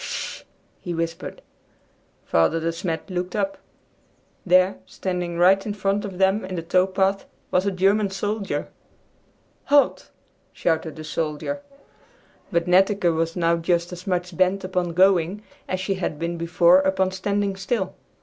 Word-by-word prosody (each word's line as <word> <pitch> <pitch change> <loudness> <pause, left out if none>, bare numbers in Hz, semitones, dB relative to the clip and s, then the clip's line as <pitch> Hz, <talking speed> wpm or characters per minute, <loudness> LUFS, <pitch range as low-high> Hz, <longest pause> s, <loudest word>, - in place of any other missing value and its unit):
"Hush!" - - -5 0.3
he 175 -1 -5
whispered. 165 0 -4 0.8
Father 85 - +2
De 165 +1 -1
Smet 165 -1 -4
looked 180 +1 -3
up. 195 -2 -1 0.8
There, 185 +1 +4
standing 180 -2 -3
right 190 +3 +5
in 205 -1 -4
front 200 0 0
of 190 -3 -7
them 190 +2 +2
in 185 0 -5
the 165 - -3
tow 180 +2 +3
path, 195 +1 0 0.2
was 185 +2 +2
a - - +2
German 195 +2 +2
soldier! 205 +1 -3 1.0
"Halt!" 285 0 +3 0.4
shouted 160 -2 -1
the 155 - -8
soldier. 155 - -3 0.9
But 170 -2 +1
Netteke 185 -1 +3
was 165 +1 -1
now 170 -1 +2
just 170 +1 0
as 180 +3 -10
much 180 -1 -1
bent 185 +3 +2
upon 180 -2 -2
going 185 +2 +3 0.2
as 185 - -2
she 185 +1 -1
had 185 -5 -3
been 170 +2 -3
before 170 +2 +4
upon 190 0 +1
standing 200 +1 -1
still. 195 +1 -2
185 Hz, 150 wpm, -23 LUFS, 170-195 Hz, 1.0 s, right